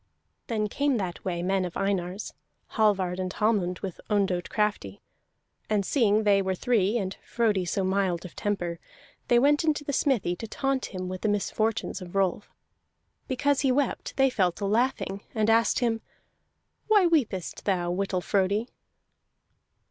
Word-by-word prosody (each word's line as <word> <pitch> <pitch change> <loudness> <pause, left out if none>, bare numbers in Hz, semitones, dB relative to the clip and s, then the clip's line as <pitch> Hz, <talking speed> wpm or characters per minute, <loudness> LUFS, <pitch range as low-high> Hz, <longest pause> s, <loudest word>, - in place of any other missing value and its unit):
Then 215 -2 0
came 280 +4 0
that 185 -5 -4
way 175 -2 -2
men 190 +1 +1
of 180 -2 -4
Einar's, 195 0 -2 0.4
Hallvard 190 -4 +2
and 185 0 -2
Hallmund, 200 -5 +1
with 190 -3 -5
Ondott 190 -4 +1
Crafty; 205 - -1 0.7
and 205 -2 +1
seeing 220 -4 +3
they 200 -1 +4
were 190 -1 -1
three, 220 -1 +1
and 190 -3 -3
Frodi 215 -6 +1
so 190 +3 -1
mild 185 -2 0
of 180 - -10
temper, 175 -5 -2 0.5
they 240 - +4
went 290 +5 +4
into 305 -2 +1
the 285 - -3
smithy 240 - +1
to 225 - -6
taunt 270 +3 -1
him 185 -1 -5
with 185 0 -5
the 215 - +1
misfortunes 215 +1 -1
of 180 +1 -9
Rolf. 195 +1 0 0.8
Because 280 +2 +1
he 270 -3 +3
wept, 275 +2 -1
they 270 -1 +4
fell 185 -7 +2
to 200 - -5
laughing, 210 -2 0
and 220 0 +3
asked 230 +1 +3
him: 225 -2 +1 0.9
"Why 420 -4 +5
weepest 240 - 0
thou, 175 -3 0
Whittle 185 0 -1
Frodi?" 200 +5 0
205 Hz, 155 wpm, -27 LUFS, 185-235 Hz, 0.9 s, Why